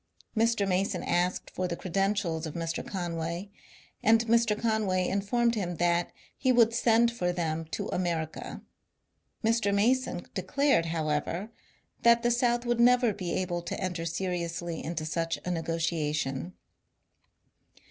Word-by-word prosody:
Mr. 225 -2 +2
Mason 190 +1 0
asked 180 +1 0
for 185 - -2
the 170 - -3
credentials 185 -3 -1
of 155 - -8
Mr. 165 0 -3
Conway, 170 +1 -4 0.5
and 225 +1 +4
Mr. 230 -2 +3
Conway 210 -5 +1
informed 230 +5 +1
him 180 -6 -2
that 175 +1 +1 0.2
he 260 - +2
would 230 -2 +5
send 235 0 +4
for 180 -7 -1
them 165 -2 -2
to 160 - -4
America. 165 -3 -3 0.8
Mr. 225 -2 +2
Mason 245 +6 +1
declared, 275 -12 +1
however, 160 +5 -2 0.5
that 235 0 +5
the 240 - +3
South 240 0 +1
would 240 -1 0
never 245 -2 +5
be 185 -3 -4
able 175 -2 -1
to - - -5
enter 180 -3 -3
seriously 170 -1 -3
into 160 -1 -3
such 165 +1 -1
a 180 - -1
ne 170 -2 -1
gotiation. 160 -2 -2
185 Hz, 135 wpm, -29 LUFS, 165-225 Hz, 0.8 s, would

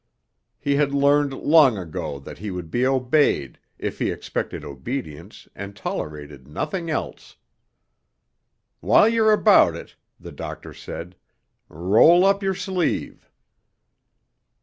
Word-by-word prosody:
He 140 -1 0
had 140 -1 +1
learned 140 0 +3
long 140 -3 +4
ago 80 -5 -5
that - - -11
he 105 - -5
would 90 -4 -7
be 125 +2 +1
obeyed 130 - +1 0.2
if - - -5
he - - 0
expected - - -5
obedience 75 - -7
and 100 0 -8
tolerated 75 -7 -6
nothing 165 - -4
else. 155 - -5 1.4
"While - - +5
you're 225 -1 +3
about 210 - +5
it," 85 - -11 0.2
the - - -10
doctor - - -8
said, 90 +2 -9 0.5
"roll 110 - +4
up 195 +1 +3
your 195 -1 -1
sleeve." 180 -3 -3
130 Hz, 120 wpm, -23 LUFS, -, 1.4 s, While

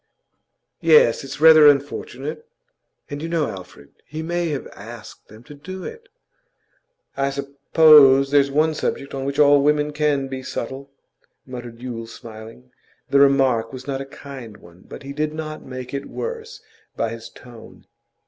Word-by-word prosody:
'Yes, 465 - +4
it's 135 +1 -8
rather 155 -1 +8
unfortunate.' 145 +1 -1 0.6
'And 145 0 -7
you 165 - -4
know, 165 -3 0
Alfred, 90 -6 -10 0.2
he 155 +4 -6
may 175 +1 -2
have 145 -3 -4
asked 110 +3 -12
them 110 +2 -15
to 145 - -13
do 185 +6 -9
it.' 460 +1 -10 1.1
'I 135 0 0
suppose 140 0 +5
there's 140 -1 +4
one 155 +3 +2
subject 140 -2 -3
on 135 -1 -4
which 140 0 -3
all 145 -1 +6
women 150 +1 +1
can 145 -2 0
be 130 0 -6
subtle,' 135 +2 -6 0.6
muttered 120 -2 -9
Yule, 115 -3 -6
smiling. 115 +2 -12 0.4
The 140 - +5
remark 135 -5 +3
was 130 -1 -9
not 135 -1 -3
a - - -6
kind 130 -6 -10
one, 85 +1 -18
but - - -10
he 140 0 -7
did 150 +1 -2
not 155 -1 -6
make 130 0 -8
it 140 0 -4
worse 470 0 -6 0.4
by 115 - 0
his 115 0 -8
tone. 120 -2 -15
140 Hz, 160 wpm, -21 LUFS, 125-150 Hz, 1.1 s, rather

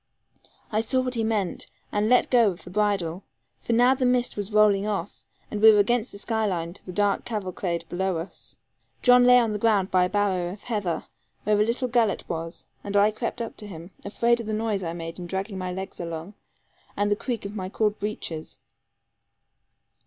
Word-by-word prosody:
I 215 0 +2
saw 255 +3 +1
what 255 -1 -2
he 230 -2 0
meant, 215 -5 -1 0.2
and 210 +1 +1
let 250 - +4
go 230 -7 +4
the - - -13
bridle; 195 -3 0 0.4
for 235 - -1
now 245 +3 +5
the 265 0 -2
mist 250 -1 +2
was 205 0 -4
rolling 210 -1 +4
off, 205 -1 -4 0.3
and 210 - -3
we 220 0 +10
were 210 - +4
against 230 +3 +2
the - - -9
sky 220 +2 -1
line 170 -3 -2
to - - -13
the 185 - -8
dark 205 +1 +1
cavalcade 185 -5 -3
below 185 0 -1
us. 165 +4 -8 0.5
John 245 -1 +7
lay 250 0 +8
on 230 -3 +3
the 210 - -2
ground 205 -4 +2
by 185 -1 +4
a - - -2
barrow 190 -4 0
of 200 - -10
heather, 200 -9 -2 0.4
where 210 0 +2
a - - +5
little 235 +3 -1
gullet 235 -4 +1
was, 165 +1 -5 0.2
and 205 0 -1
I 205 +1 +5
crept 230 +2 -4 0.2
to 210 - -8
him, 170 -1 -10
afraid 235 +3 +1
of 230 - -6
the 215 - -2
noise 215 -2 -1
I 165 -2 -3
made 165 0 -6
in 175 - -6
dragging 190 +2 -4
my 185 0 -3
legs 190 +1 -6
along, 170 +2 -5 0.6
and 205 0 +1
the - - +4
creak 230 -1 -4
of 200 +2 -6
my 185 -2 -4
cord 210 +1 0
breeches. 190 -6 -5
205 Hz, 205 wpm, -25 LUFS, 185-225 Hz, 0.6 s, we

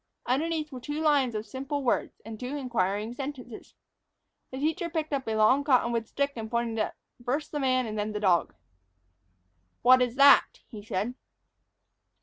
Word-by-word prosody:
Underneath 305 +4 -1
were 255 - -7
two 295 +4 -5
lines 285 -6 +2
of 215 0 -3
simple 275 +5 -4
words, 245 - -1
and 220 -1 -8
two 260 +3 -4
inquiring 220 -4 -1
sentences. 260 -3 -8 0.7
The 260 - -7
teacher 320 +4 -1
picked 315 -2 -3
up 270 -3 -2
a 220 - -1
long 220 +6 +4
cottonwood 235 -5 +2
stick 280 +2 -1
and 220 -2 -6
pointed 235 -1 -1
it 215 - -1 0.3
first 275 +5 -2
at - - -34
the 295 - -2
man 255 -2 +1
and 215 -1 -4
then 210 - -1
at 215 - -5
the - - -1
dog. 175 - +2 1.3
"What 255 +1 +7
is 245 -1 0
that?" 280 +1 +6
he 210 -3 -10
said. 210 +3 -2
255 Hz, 175 wpm, -28 LUFS, 220-285 Hz, 1.3 s, What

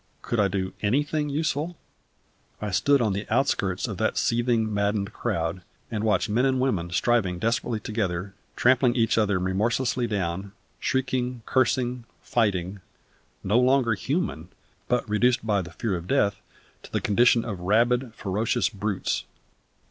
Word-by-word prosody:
Could 120 - -1
I 100 - +4
do 95 -1 -3
anything 145 +7 0
useful? 150 +3 -1 0.8
I 105 -1 -3
stood 140 +8 +3
on 105 -3 +1
the 100 +2 -4
outskirts 100 -9 +1
of - - -5
that - - 0
seething, 115 -2 +1
maddened 100 0 0
crowd, 90 -5 -2 0.3
and 110 -2 -2
watched 110 -1 +2
men 115 +4 +1
and 130 -1 +2
women 100 -10 0
striving 95 -1 +1
desperately 115 +2 -1
together, 100 -3 -3 0.2
trampling 125 0 +3
each 115 -2 +2
other 100 -3 +2
remorselessly 115 +7 0
down; 95 -2 -3 0.3
shrieking, 125 -2 -1
cursing, 125 -1 +1 0.2
fighting; 100 -4 0 0.6
no 105 +5 +3
longer 125 -2 +3
human, 105 - -2 0.4
but 125 -1 0
reduced 120 +3 +2
by 105 -3 +2
the 90 - -8
fear 95 +4 -2
of 85 0 -6
death 105 -8 +1 0.4
to - - -14
the - - 0
condition 115 +2 +3
of 100 -6 -4
rabid, 120 +6 +2
ferocious 105 +2 0
brutes. 100 -1 -2
110 Hz, 145 wpm, -26 LUFS, 100-125 Hz, 0.8 s, I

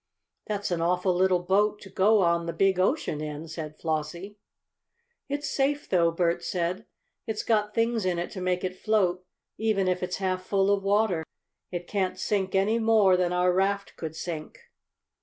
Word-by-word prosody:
"That's 205 -2 -2
an 170 -1 0
awful 180 +2 +1
little 180 0 +2
boat 205 +3 +2
to 195 - -11
go 205 +1 +4
on 170 0 +1
the 170 - -2
big 190 +2 +2
ocean 185 - 0
in," 150 +1 -5
said 155 -1 -7
Flossie. 170 +6 -4 0.9
"It's 290 +1 -2
safe, 285 +1 0
though," 170 -3 +3
Bert 170 0 0
said. 180 +4 -2 0.4
"It's 220 -1 -2
got 210 -2 +1
things 230 -1 +1
in 180 -2 0
it 175 - -3
to 185 - -6
make 180 0 0
it 185 0 -2
float, 185 -4 +1 0.4
even 215 -4 +1
if 180 0 0
it's 180 0 -2
half 185 -1 -1
full 195 +1 +2
of 200 - 0
water. 200 -4 +1 0.5
It 175 -1 -5
can't 190 -1 -1
sink 190 0 -1
any 210 +4 +2
more 220 -4 +4
than 180 -1 +1
our 180 0 +2
raft 200 +2 0
could 160 -1 -6
sink." 160 -2 -6
185 Hz, 175 wpm, -27 LUFS, 175-205 Hz, 0.9 s, go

